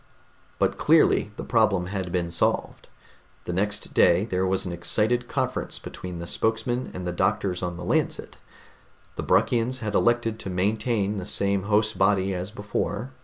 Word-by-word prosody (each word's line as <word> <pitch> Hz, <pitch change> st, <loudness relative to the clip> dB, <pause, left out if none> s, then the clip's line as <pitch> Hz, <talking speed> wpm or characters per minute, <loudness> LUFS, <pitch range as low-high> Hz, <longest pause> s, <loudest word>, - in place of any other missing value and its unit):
But -, -, 0 dB
clearly -, -, +4 dB
the -, -, -6 dB
problem 90 Hz, -2 st, +2 dB
had 95 Hz, -1 st, -4 dB
been 85 Hz, -1 st, -1 dB
solved. 85 Hz, -, -1 dB, 0.6 s
The 90 Hz, -, -3 dB
next 105 Hz, +3 st, -1 dB
day 85 Hz, +4 st, +4 dB
there 95 Hz, -3 st, -1 dB
was 95 Hz, +1 st, 0 dB
an 90 Hz, -, -4 dB
excited 110 Hz, +8 st, 0 dB
conference 130 Hz, -1 st, -2 dB
between 90 Hz, -1 st, -8 dB
the 85 Hz, -, -6 dB
spokesman 115 Hz, +6 st, -1 dB
and 90 Hz, 0 st, -5 dB
the 90 Hz, -, -1 dB
doctors 95 Hz, 0 st, 0 dB
on 90 Hz, -1 st, -3 dB
the 90 Hz, -, -7 dB
Lancet. -, -, -1 dB, 0.8 s
The -, -, -3 dB
Bruckians 125 Hz, +2 st, +1 dB
had 105 Hz, -2 st, -3 dB
elected 115 Hz, -1 st, +1 dB
to 95 Hz, -, -6 dB
maintain 105 Hz, +2 st, 0 dB
the 95 Hz, -, -4 dB
same 100 Hz, -1 st, +1 dB
host 110 Hz, +1 st, +2 dB
body 95 Hz, 0 st, +3 dB
as 90 Hz, +1 st, -4 dB
before. 105 Hz, +3 st, -3 dB
100 Hz, 165 wpm, -25 LUFS, 90-110 Hz, 0.8 s, clearly